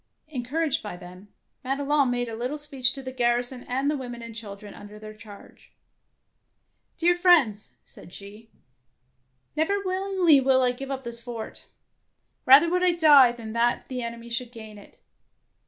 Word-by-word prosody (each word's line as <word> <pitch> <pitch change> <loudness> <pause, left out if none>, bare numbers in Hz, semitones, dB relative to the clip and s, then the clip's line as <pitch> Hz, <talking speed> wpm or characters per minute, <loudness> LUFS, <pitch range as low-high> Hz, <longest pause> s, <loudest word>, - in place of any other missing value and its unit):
Encouraged 290 +3 -2
by 205 -4 -8
them, 180 +2 -13 0.4
Madelon 280 +1 0
made 245 0 -2
a 225 - -6
little 250 +6 -4
speech 275 -4 0
to 270 - -9
the 260 - -6
garrison 245 0 -1
and 265 +3 -2
the 300 - +1
women 245 -3 -7
and 230 0 -9
chil 215 -3 -9
dren 205 0 -13
under 205 +1 -12
their 215 0 -10
charge. 210 -1 -16 1.2
'^Dear 350 +1 +2
friends," 320 - +2
said - - -14
she, 205 +4 -13 1.1
"never 320 +7 0
willingly 370 -5 +2
will 260 0 +3
I 250 - +2
give 270 +2 -8
up 270 -1 -5
the 235 -1 -6
fort. 235 -1 -4 0.8
Eather 275 +6 +8
would 360 0 +1
I 365 -1 +3
die 295 -7 +6
than 230 -2 -9
that 235 +1 0
the 255 -1 -4
enemy 235 0 -7
should 235 0 -4
gain 220 -3 -11
it. 205 - -18
245 Hz, 165 wpm, -25 LUFS, 230-285 Hz, 1.2 s, Eather